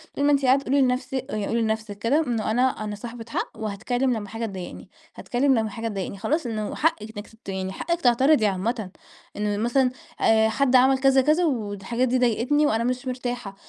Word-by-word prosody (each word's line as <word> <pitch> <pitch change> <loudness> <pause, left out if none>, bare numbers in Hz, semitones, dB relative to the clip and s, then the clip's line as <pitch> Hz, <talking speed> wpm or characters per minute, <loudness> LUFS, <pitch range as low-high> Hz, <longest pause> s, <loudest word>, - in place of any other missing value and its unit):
طول 285 - 0
ما 290 - +4
أنتِ 280 -1 +2
قاعدة 270 +2 +3
قولي 275 +2 +2
لنفسِك، 255 0 0
قولي 215 +2 -1
لنفسِك 220 -2 -2
كده: 250 +8 +2
إنه 225 -3 -1
أنا، 250 +3 +3 0.2
أنا 210 -1 -4
صاحبة 230 +2 -8
حق، - - -3
وهاتكلم. 240 +5 -1
لما 210 -3 -5
حاجة 225 +2 -4
تضايقني 190 -4 -8 0.3
هاتكلم، 265 +2 +1
لما 220 -2 0
حاجة 225 +2 -5
تضايقني 200 -2 -4
هاتكلم، 220 +5 -5
خلاص. 310 -1 +1
إنه 215 -3 -3
حقِك 320 -7 +1 0.2
إنك 205 - -7 0.2
ت - - -9
يعني 190 0 -3
حقِك 340 - -2
تعترضي 250 +1 +4
عامة. 205 +1 -1 0.5
إنه 210 -1 -1
مثلًا 245 +4 +2 0.3
آآ، 220 0 +4
حد 260 +3 +2
عمل 265 +1 +5
كذا، 270 0 +4
كذا، 310 +6 +3
والحاجات 235 - -1
دي 255 +1 +1
ضايقتني، 250 +5 +2
وأنا 225 -4 +1
مش 250 +2 -2
مرتاحة. 245 -5 -4
235 Hz, 195 wpm, -24 LUFS, 215-260 Hz, 0.5 s, عمل